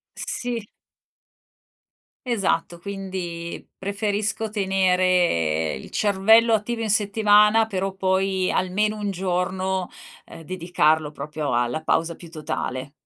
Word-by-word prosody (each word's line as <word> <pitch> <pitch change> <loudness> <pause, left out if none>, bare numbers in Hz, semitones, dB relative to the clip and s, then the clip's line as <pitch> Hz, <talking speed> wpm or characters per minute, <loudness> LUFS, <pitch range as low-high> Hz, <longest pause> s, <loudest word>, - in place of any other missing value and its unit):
Sì. 235 -4 -4 1.6
Esatto. 190 -7 0
Quindi, 185 -3 -6
preferisco 205 +2 -1
tenere 180 - +2
il 65 - -8
cervello 220 +3 +4
attivo 225 +2 0
in 220 - -1
settimana, 210 +1 +4
però 195 -2 -2
poi 190 0 +1
almeno 210 +4 0
1 205 -1 -3
giorno, 185 0 -1 0.4
ehm, - - -11
dedicarlo 160 -3 +1
proprio 150 0 -4
alla 120 +5 0
pausa 165 +1 0
più 170 - -12
totale. 150 -4 -4
190 Hz, 100 wpm, -23 LUFS, 170-205 Hz, 1.6 s, cervello